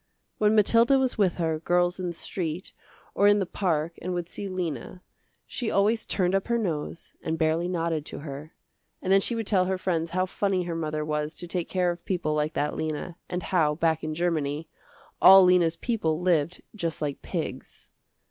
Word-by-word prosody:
When 210 0 +4
Mathilda 230 +5 +5
was 260 -4 0
with 190 -4 +3
her 160 -2 -1
girls 175 +2 +1
in 185 - -2
the 170 - -3
street 170 0 -4 0.4
or 200 - +4
in 205 0 +6
the 195 - 0
park 170 -3 -1
and 180 +1 -3
would 175 -1 -3
see 200 - -6
Lena, 180 -2 -4 0.4
she 240 -4 -3
always 215 +3 +1
turned 180 -1 +1
up 195 0 0
her 235 0 +1
nose 170 -6 -4
and 160 0 -2
barely 160 +2 +1
nodded 165 -3 -1
to - - -7
her, 145 +2 -7 0.5
and 190 - +1
then 195 - +6
she 235 - 0
would 225 -1 -2
tell 190 -3 +2
her 190 0 -1
friends 170 -3 -1
how 185 +2 0
funny 190 0 0
her 175 -1 -4
mother 155 -2 -2
was 150 0 -2
to 175 - -6
take 175 -1 -3
care 180 -2 +1
of 170 0 -8
people 175 -5 -1
like 150 +1 0
that 150 - -1
Lena, 155 +2 -4
and 180 0 -3
how, 155 -5 +2
back 160 0 +1
in 155 0 -3
Germany, 160 -2 -1 0.5
all 190 0 +10
Lena's 180 -2 +4
people 165 -8 -1
lived 170 -2 0
just 165 -6 -2
like 145 -2 -3
pigs. - - -6
175 Hz, 195 wpm, -26 LUFS, 160-190 Hz, 0.5 s, all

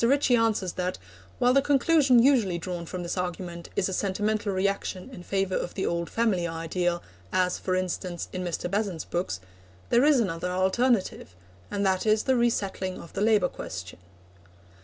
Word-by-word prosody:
Ritchie 265 +1 +4
answers 220 -5 +1
that, 180 0 -2 0.4
while 245 +1 +4
the 275 - +5
conclusion 285 -1 +4
usually 235 -10 +3
drawn 170 0 -5
from 180 0 -5
this 175 +2 -3
argument 175 -1 -5
is 185 - +1
a 190 - -3
sentimental 205 +2 0
reaction 195 +3 -2
in 205 - -9
favour 195 +1 -1
of 175 - -2
the 190 - -1
old 170 0 -1
family 205 -7 +1
ideal, 170 +1 -2 0.3
as, 180 -1 +1
for 185 - -1
instance, 180 -1 -3
in 185 -1 -3
Mr. 175 -1 -2
Besant's 195 -3 -2
books, 175 - -2 0.5
there 240 - +5
is 290 -2 +5
another 180 -5 -1
alternative, 190 - +1 0.3
and 200 0 -1
that 190 +2 +1
is 215 0 +3
the 265 - +2
resettling 200 -6 0
of 170 - -12
the 195 - -3
labour 210 -4 +4
question. 90 0 -7
190 Hz, 170 wpm, -27 LUFS, 175-225 Hz, 0.5 s, the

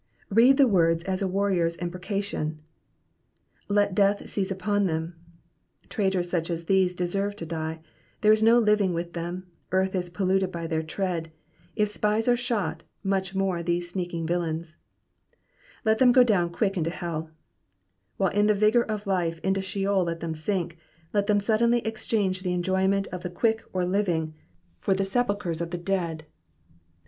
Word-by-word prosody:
Read 240 +6 +6
the 275 -2 +6
words 165 -5 +3
as 190 0 -2
a 195 - +1
warrior^s 185 -3 0
imprecation. 180 -2 -3 1.1
''''Let 205 -1 +2
death 200 +1 +2
seize 195 -1 -2
Tpon 200 +1 0
them.''^ 165 0 -8
Traitors 190 -5 0
such 170 -1 -1
as 170 -1 -3
these 185 -1 +2
deserve 195 +3 -1
to 170 - -6
die, 160 0 -4 0.4
there 215 - +6
is 215 0 +4
no 225 +2 +6
living 210 -5 +3
with 170 +1 -4
them, 175 +2 -5 0.3
earth 190 +1 +1
is 180 -2 -2
polluted 190 +1 0
by 170 -2 -5
their 160 -1 -1
tread; 165 0 -3 0.4
if 210 -1 +2
spies 210 +2 0
are 245 - +5
shot, 210 -10 -2 0.2
much 195 -1 -1
more 190 -3 0
these 175 +1 -1
sneaking 175 -3 -3
villains, 165 -1 -2 1.1
^^Let 220 0 +3
them 255 -2 +6
go 250 0 +7
down 195 -8 +2
quick 195 +2 -1
into 165 -1 0
hdV 165 -2 -4 0.9
While 190 -2 +1
in 205 +1 +3
the 210 - +4
vigour 215 +4 +4
of 215 -1 -4
life 175 -4 0
into 190 0 +1
sheol 195 0 0
let 165 0 -3
them 165 -1 -3
sink, 170 +1 -3 0.3
let 205 -1 +1
them 210 -1 +3
suddenly 235 +3 +2
exchange 210 -4 -1
the 180 -1 -1
enjoy 190 +2 +1
ment 195 0 +1
of 180 - -6
the 180 - -4
quick 220 +5 0
or 180 -1 0
living 175 -5 0 0.5
for 195 - +1
the 195 0 0
sepulchres 200 -6 -1
of 170 - -3
the 175 - -3
dead. 170 -3 -2
190 Hz, 170 wpm, -26 LUFS, 170-205 Hz, 1.1 s, go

